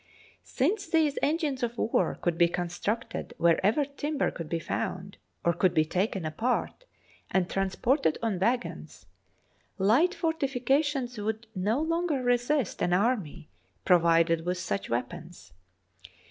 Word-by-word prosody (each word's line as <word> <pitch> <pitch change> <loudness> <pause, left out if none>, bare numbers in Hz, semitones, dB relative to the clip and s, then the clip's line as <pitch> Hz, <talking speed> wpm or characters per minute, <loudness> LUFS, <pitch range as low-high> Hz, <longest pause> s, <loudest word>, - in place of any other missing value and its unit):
Since 390 +9 -1
these 320 -4 +2
engines 295 -3 0
of 240 -1 -2
war 225 - +1
could 175 -2 0
be 170 0 +4
constructed 180 +8 -3
wherever 195 - +3
timber 285 +1 -2
could 165 -3 -7
be 170 - 0
found 185 +3 -4 0.3
or 170 - +4
could 180 +1 +1
be 155 - +4
taken 185 +1 -1
apart 235 - -2 0.4
and 185 -2 +1
transported 195 - +1
on 215 -6 0
waggons, 240 +6 -2 0.7
light 245 - +3
fortifica 275 -4 +1
tions 260 -6 -3
would 220 +2 -3
no 210 +7 0
longer 325 -3 0
resist 245 0 +1
an 175 - +1
army 185 - 0 0.4
provided 165 -2 +4
with 180 +1 -1
such 180 +2 -3
weapons. 120 - -5
220 Hz, 130 wpm, -28 LUFS, 175-275 Hz, 0.7 s, be